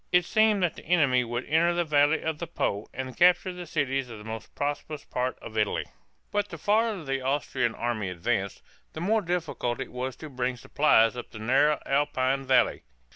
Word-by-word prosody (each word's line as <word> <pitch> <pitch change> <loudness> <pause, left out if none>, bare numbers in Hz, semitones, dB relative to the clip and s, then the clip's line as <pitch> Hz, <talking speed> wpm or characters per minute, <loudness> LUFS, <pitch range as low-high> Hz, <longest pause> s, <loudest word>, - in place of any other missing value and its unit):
It 180 -1 +4
seemed 215 -1 +3
that 175 - +1
the - - -13
enemy 145 -7 +3
would 120 +1 -4
enter 170 +3 +2
the 175 - +2
valley 150 0 +3
of 160 -2 -2
the 170 - -4
Po 105 -10 -2
and 130 0 -6
capture 180 +1 +4
the 180 -1 -8
cities 135 -4 -1
of 115 - -8
the 105 - -11
most 110 0 -8
prosperous 145 +1 -3
part 125 +1 -2
of 110 - -9
Italy. 105 -2 0 0.5
But 205 0 0
the 170 - -7
farther 210 +2 +1
the 135 -2 -2
Austrian 130 -3 -1
army 115 -5 -2
advanced, 95 +2 -2 0.3
the - - -6
more 215 +6 +2
difficult 165 - -2
it - - -5
was 125 0 -4
to 155 - -9
bring 125 -1 -2
supplies 115 -4 +3
up 120 - -7
the - - -11
narrow 135 +7 +3
Alpine 135 -1 0
valleys. 130 -1 +3
140 Hz, 195 wpm, -27 LUFS, 125-170 Hz, 0.5 s, It